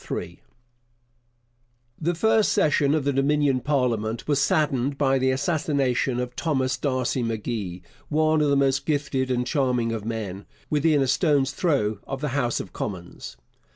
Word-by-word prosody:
The 170 +2 0
first 220 +4 +3
session 145 -1 +2
of 155 - 0
the 140 +1 0
Dominion 140 0 +2
parliament 120 -5 -1
was 145 -2 +2
saddened 140 -2 +1
by 135 -2 +2
the 130 0 +2
assassination 135 -3 0
of 125 0 -4
Thomas 130 -6 0
D'Arcy 130 -2 -1
M'Gee, 110 -5 -3 0.3
one 155 0 +2
of 150 - +2
the 140 - +3
most 135 -1 +1
gifted 140 -3 0
and 125 -1 0
charming 125 -4 0
of 110 -2 -4
men, 105 -4 -5 0.2
within 150 -1 +3
a - - -1
stone's 140 -1 +2
throw 135 - 0
of 135 - -4
the 150 +1 -2
House 125 -3 0
of - - -8
Commons. 85 - -6
135 Hz, 150 wpm, -24 LUFS, 120-150 Hz, 0.3 s, first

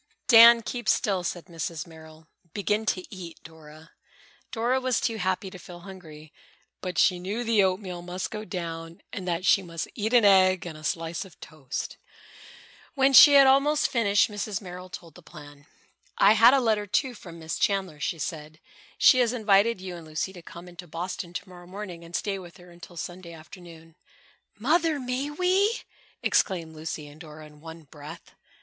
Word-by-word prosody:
"Dan, 230 0 +8
keep 240 -1 -4
still," 195 -4 +1
said 175 0 -4
Mrs. 165 -2 -5
Merrill. 160 -1 -15 0.3
"Begin 210 +2 -1
to 185 - 0
eat, 175 -3 -9
Dora." 160 0 -15 0.6
Dora 250 +2 0
was 255 -1 0
too 225 -2 -2
happy 190 0 -2
to 185 - -11
feel 175 0 -12
hungry, 160 -5 -12 0.5
but 180 -1 -5
she 180 -2 +3
knew 200 +7 -4
the 225 -3 +3
oatmeal 185 -2 -1
must 180 +1 -5
go 215 0 -5
down 165 -4 -7
and 185 -2 -6
that 175 +1 -2
she 195 - +4
must 170 -3 -6
eat 220 -1 -3
an 235 -3 +5
egg 185 -3 +4
and 165 -3 -7
a 155 - -13
slice 165 +2 -3
of 190 -4 -17
toast. 145 -5 -7 1.0
When 270 0 +3
she 290 +2 +10
had 275 -1 +8
almost 275 +3 +3
finished, 205 -4 +2
Mrs. 205 -2 -4
Merrill 180 -1 -10
told 170 -3 -10
the - - -15
plan. 145 -1 -14 0.5
"I 200 +2 +6
had 230 +4 +6
a - - +3
letter, 215 -4 0
too, 255 +5 0
from 170 -6 -12
Miss 160 -1 -5
Chandler," 190 -6 -1
she 165 +3 -2
said. 155 -1 -6 0.4
"She 255 - +6
has 245 -1 +2
invited 215 -1 +2
you 185 -1 -7
and 165 -2 -11
Lucy 155 +5 -4
to 175 - -11
come 170 +1 -12
into 175 0 -11
Boston 175 +2 -5
to 185 +3 -6
morrow 175 -1 -14
morning 185 -3 -8
and 170 +1 -9
stay 195 -2 -2
with 175 -2 -13
her 180 0 -16
until 175 0 -14
Sunday 175 0 -7
afternoon." 165 0 -14 0.6
"Mother! 310 - +1
May 255 +2 -3
we?" 370 +8 +1 0.4
exclaimed 170 -6 0
Lucy 155 -1 -6
and 145 +3 -14
Dora 155 -1 -11
in 150 -1 -17
one 165 0 -11
breath. 150 +3 -12
180 Hz, 180 wpm, -26 LUFS, 165-215 Hz, 1.0 s, she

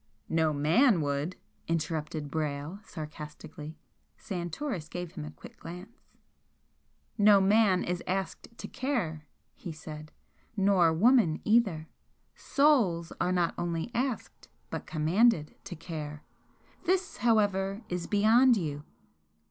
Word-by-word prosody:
"No 160 -1 +2
MAN 170 - +4
would," 145 +4 -2 0.3
interrupted 155 -2 -2
Brayle, 150 +3 -3
sarcastically. 155 -3 -9 0.4
Santoris 175 - -4
gave 175 -2 -5
him - - -7
a - - -6
quick 75 - -14
glance. 180 +8 -10 1.2
"No 205 -1 +7
man 195 -1 +4
is 175 0 -2
asked 190 +1 -3
to - - -7
care!" 175 - -3 0.3
he 175 - -8
said 155 0 -9 0.5
"Nor 190 -4 +4
woman 195 -1 +4
either. 200 -8 +2 0.5
SOULS 230 - +2
are 180 - +1
not 175 -2 +1
only 170 +5 -2
asked, 250 0 -3 0.2
but - - -5
COMMANDED, 165 +2 +2
to 195 -3 -6
care! 155 -3 -7 0.6
This, 370 +1 0
however, 205 -2 +1
is 175 -1 -3
beyond 225 +4 +5
you!" 150 -5 -3
175 Hz, 115 wpm, -29 LUFS, 155-215 Hz, 1.2 s, No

